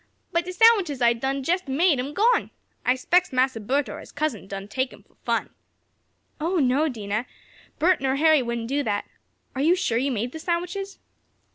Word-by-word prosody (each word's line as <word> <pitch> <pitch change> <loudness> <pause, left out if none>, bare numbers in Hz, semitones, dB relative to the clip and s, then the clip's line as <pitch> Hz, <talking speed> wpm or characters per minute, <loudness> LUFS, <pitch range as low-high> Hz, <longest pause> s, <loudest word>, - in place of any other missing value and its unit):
But 340 0 0
de 365 - -4
sandwiches 370 - +4
I 240 -1 +4
done 265 +3 -2
jest 355 +4 0
made 290 +2 +2
am 275 +4 -4
gone. 465 +5 +3 0.3
I 250 - +3
s'pects 355 +7 +2
Massa 255 -2 +1
Bert 260 +6 0
or - - -7
his - - -12
cousin 285 -10 -3
done 195 0 -6
take 260 +4 -2
'em - - -15
fo' - - -33
fun." - - -1 0.9
"Oh, 335 +5 -1
no, 285 +2 +2
Dinah. 215 -1 -3 0.5
Bert 340 +1 +3
nor 265 0 +1
Harry 310 0 +4
wouldn't 235 -1 -3
do 280 +3 0
that. 205 -6 -1 0.5
Are 265 - -3
you 330 +5 +4
sure 255 -11 0
you 275 +2 0
made 240 +1 -2
the 320 - -7
sandwiches?" 360 +4 -3
275 Hz, 190 wpm, -24 LUFS, 250-340 Hz, 0.9 s, sandwiches